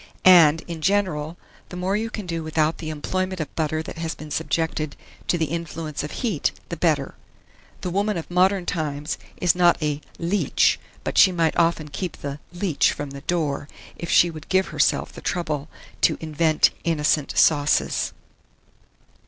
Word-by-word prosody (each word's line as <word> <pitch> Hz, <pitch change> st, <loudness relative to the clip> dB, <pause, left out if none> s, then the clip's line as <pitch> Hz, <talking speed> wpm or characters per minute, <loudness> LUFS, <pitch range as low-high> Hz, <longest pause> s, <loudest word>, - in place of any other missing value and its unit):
And, 165 Hz, -4 st, +7 dB
in 170 Hz, -2 st, -7 dB
general, 170 Hz, -3 st, 0 dB, 0.3 s
the 180 Hz, -, -7 dB
more 185 Hz, +2 st, 0 dB
you 225 Hz, +2 st, -1 dB
can 210 Hz, -3 st, -6 dB
do 165 Hz, -2 st, -3 dB
without 155 Hz, 0 st, 0 dB
the 155 Hz, -, -5 dB
employment 185 Hz, +5 st, -2 dB
of 155 Hz, -, -5 dB
butter 155 Hz, 0 st, -1 dB
that 165 Hz, -, -8 dB
has 165 Hz, -1 st, -3 dB
been 155 Hz, -1 st, -10 dB
subjected 160 Hz, -1 st, -1 dB, 0.3 s
to 175 Hz, -, +2 dB
the 160 Hz, -, +1 dB
influence 165 Hz, -1 st, -4 dB
of 150 Hz, -, -4 dB
heat, 210 Hz, -, -1 dB, 0.2 s
the 170 Hz, -, -3 dB
better. 155 Hz, -5 st, +1 dB, 0.7 s
The 180 Hz, -, -3 dB
woman 200 Hz, +1 st, 0 dB
of 165 Hz, -, -6 dB
modern 185 Hz, +1 st, +3 dB
times 150 Hz, -3 st, -3 dB, 0.2 s
is 175 Hz, -2 st, +3 dB
not 175 Hz, -1 st, +4 dB
a 150 Hz, -2 st, -1 dB, 0.2 s
"leech;" 170 Hz, -2 st, +2 dB, 0.2 s
but -, -, 0 dB
she 190 Hz, -, +8 dB
might 165 Hz, -3 st, +1 dB
often 165 Hz, -2 st, +1 dB
keep 175 Hz, +3 st, -5 dB
the 140 Hz, 0 st, -6 dB
"leech" 175 Hz, -4 st, +1 dB
from 145 Hz, -1 st, -6 dB
the 140 Hz, 0 st, -8 dB
door, 150 Hz, -3 st, -1 dB, 0.3 s
if 170 Hz, -, -7 dB
she 175 Hz, -, +5 dB
would 155 Hz, -1 st, -11 dB
give 190 Hz, 0 st, +2 dB
herself -, -, +1 dB
the -, -, -10 dB
trouble 155 Hz, -5 st, -2 dB, 0.3 s
to -, -, +3 dB
invent 155 Hz, 0 st, +2 dB
innocent 155 Hz, -3 st, +1 dB
sauces. 145 Hz, -1 st, +3 dB
165 Hz, 170 wpm, -23 LUFS, 150-180 Hz, 0.7 s, she